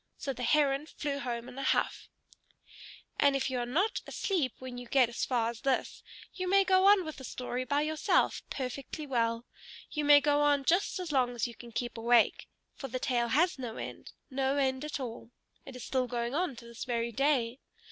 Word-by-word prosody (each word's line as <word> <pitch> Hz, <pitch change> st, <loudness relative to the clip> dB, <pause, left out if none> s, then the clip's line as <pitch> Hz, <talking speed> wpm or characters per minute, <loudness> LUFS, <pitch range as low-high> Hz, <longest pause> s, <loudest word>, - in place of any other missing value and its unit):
So 275 Hz, -, -3 dB
the 255 Hz, -, -8 dB
Heron 280 Hz, +2 st, +2 dB
flew 285 Hz, -3 st, -4 dB
home 240 Hz, -3 st, -4 dB
in 265 Hz, -, -9 dB
a -, -, -3 dB
huff. -, -, 0 dB, 1.1 s
And 280 Hz, -1 st, +4 dB
if 270 Hz, 0 st, -1 dB
you 255 Hz, -, -1 dB
are 240 Hz, -, -2 dB
not 355 Hz, -, 0 dB
asleep 335 Hz, -, -1 dB
when 255 Hz, -1 st, -7 dB
you 245 Hz, -, -9 dB
get 255 Hz, -2 st, +4 dB
as 235 Hz, -, -2 dB
far 235 Hz, -3 st, 0 dB
as 235 Hz, -, -12 dB
this, 270 Hz, -2 st, -1 dB, 0.3 s
you 370 Hz, -1 st, -3 dB
may 395 Hz, +1 st, +5 dB
go 375 Hz, 0 st, +4 dB
on 400 Hz, -3 st, +6 dB
with 315 Hz, -, -6 dB
the 265 Hz, -, -10 dB
story 250 Hz, 0 st, -4 dB
by 285 Hz, +2 st, +1 dB
yourself, 310 Hz, 0 st, +1 dB
perfectly 275 Hz, +3 st, -5 dB
well. 230 Hz, -3 st, 0 dB, 0.5 s
You 300 Hz, -, -2 dB
may 290 Hz, 0 st, +8 dB
go 290 Hz, 0 st, +2 dB
on 290 Hz, -2 st, +3 dB
just 365 Hz, +4 st, +2 dB
as 355 Hz, -3 st, -4 dB
long 250 Hz, -3 st, +1 dB
as 230 Hz, -, 0 dB
you 235 Hz, -, -9 dB
can 235 Hz, +1 st, -12 dB
keep 240 Hz, 0 st, -4 dB
awake. 235 Hz, 0 st, +3 dB, 0.3 s
For 270 Hz, -, -7 dB
the 255 Hz, 0 st, -3 dB
tale 245 Hz, -2 st, 0 dB
has 310 Hz, +6 st, +2 dB
no 235 Hz, -3 st, -5 dB
end, -, -, -7 dB, 0.2 s
no 270 Hz, +1 st, 0 dB
end 265 Hz, -1 st, +1 dB
at 300 Hz, -1 st, -4 dB
all. 230 Hz, -3 st, -6 dB, 0.4 s
It 265 Hz, -, -9 dB
is 250 Hz, -, -8 dB
still 255 Hz, -1 st, 0 dB
going 240 Hz, 0 st, -2 dB
on 325 Hz, -3 st, -1 dB
to 235 Hz, -, -12 dB
this 235 Hz, -1 st, -8 dB
very 235 Hz, -1 st, -1 dB
day. 260 Hz, -1 st, +1 dB
265 Hz, 210 wpm, -31 LUFS, 240-295 Hz, 1.1 s, may